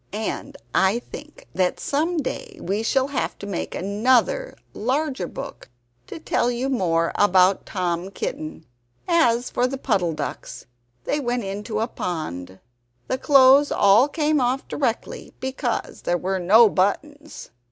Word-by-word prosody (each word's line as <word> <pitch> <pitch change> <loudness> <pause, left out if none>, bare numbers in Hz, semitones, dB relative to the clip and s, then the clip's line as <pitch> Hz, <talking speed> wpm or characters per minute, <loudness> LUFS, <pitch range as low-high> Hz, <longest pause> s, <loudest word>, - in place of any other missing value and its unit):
And 215 +1 -4 0.2
I 190 +4 +3
think 295 +5 -11
that 185 -1 0
some 325 +5 -1
day 400 - -4
I 200 +3 0
shall 265 +4 +1
have 280 - -2
to - - -8
make 200 -3 -4
another, 250 - +1 0.2
larger 260 - -1
book, - - -9 0.4
to - - -7
tell 280 -6 0
you 245 +2 -2
more 170 -9 +1
about 190 -1 +3
Tom 180 -1 -2
Kitten! 160 -4 -6 0.4
As 250 -9 +2
for 250 - +1
the 270 +1 -4
Puddle 195 -11 0
ducks - - -6 0.4
they 295 - -1
went 245 -3 -2
into 210 +3 -4
a 225 - 0
pond. 95 - -5 0.5
The 260 - -1
clothes 275 +1 +6
all 205 +6 +5
came 300 -1 +1
off 255 +2 0
directly, 245 -5 -3
because 260 -2 -3
there 175 - 0
were 190 +2 -2
no 215 +6 +6
buttons. 290 +11 -2
235 Hz, 140 wpm, -23 LUFS, 190-275 Hz, 0.5 s, clothes